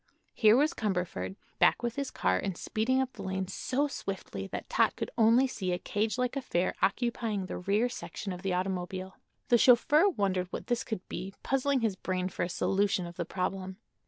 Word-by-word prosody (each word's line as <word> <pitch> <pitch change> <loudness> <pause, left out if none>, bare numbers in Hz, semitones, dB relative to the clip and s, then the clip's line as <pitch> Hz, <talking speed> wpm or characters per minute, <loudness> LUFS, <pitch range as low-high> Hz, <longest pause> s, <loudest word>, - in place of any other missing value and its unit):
Here 220 +1 +6
was 300 +4 +3
Cumberford, 180 - -2 0.2
back - - +4
with 235 0 -1
his 280 -1 -2
car 95 0 +1
and 190 -3 -3
speeding 245 +5 0
up 265 -1 -1
the - - -9
lane 190 0 -2
so 275 +9 -1
swiftly 190 - -5
that - - -6
Tot - - +2
could - - -4
only 230 +4 +5
see 190 -8 -2
a - - 0
cage 215 +5 -1
like 250 +1 0
affair 185 -10 0
occupying 215 -1 0
the - - -5
rear 200 +6 +2
section 215 -5 -6
of 180 - -8
the 195 -1 -1
automobile. 185 0 -3 0.3
The 240 - +6
chauffeur 295 - +6
wondered 195 - 0
what - - -5
this 240 -1 0
could 205 -5 -5
be, 195 +1 -6
puzzling 270 0 +1
his 220 -4 +1
brain 185 -1 -2
for - - -5
a 175 - 0
solution 195 +1 +1
of 170 0 -8
the 170 - -3
problem. 190 +1 -3
200 Hz, 195 wpm, -30 LUFS, 185-240 Hz, 0.3 s, Here